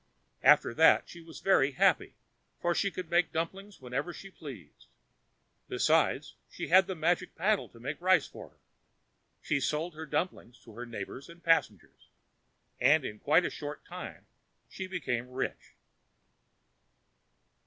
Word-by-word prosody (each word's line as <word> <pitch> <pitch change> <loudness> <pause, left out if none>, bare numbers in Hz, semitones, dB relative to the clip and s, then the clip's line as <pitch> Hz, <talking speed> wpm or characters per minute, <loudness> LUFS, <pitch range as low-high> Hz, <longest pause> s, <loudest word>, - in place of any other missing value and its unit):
After - - +5
that 160 +6 +5
she 170 - -11
was 165 -1 -12
very 145 -8 +3
happy, - - +2 0.4
for 175 - +1
she 200 - +1
could 180 -3 -7
make 175 0 +3
dumplings 190 +5 -4
whenever 135 +6 -3
she 195 +2 -11
pleased. 120 - -11 0.8
Besides, - - +2 0.2
she - - -6
had 185 +2 +6
the 190 - -3
magic 175 +3 0
paddle 205 +4 +1
to 115 - -17
make 145 +7 -5
rice 185 -4 +4
for - - -11
her. - - -32 0.9
She 145 - 0
sold 155 +5 -1
her 160 +1 -8
dumplings 145 -5 -3
to 115 - -14
her 120 +3 -7
neighbors 120 +5 -7
and 170 +1 -14
passengers, 165 - 0 0.7
and 140 +3 +4
in 105 - -6
quite 160 +5 +3
a - - -2
short 150 -1 -7
time - - -9 0.4
she 190 - -6
became 125 -10 -3
rich. 125 +1 -5
160 Hz, 145 wpm, -30 LUFS, 130-180 Hz, 0.9 s, had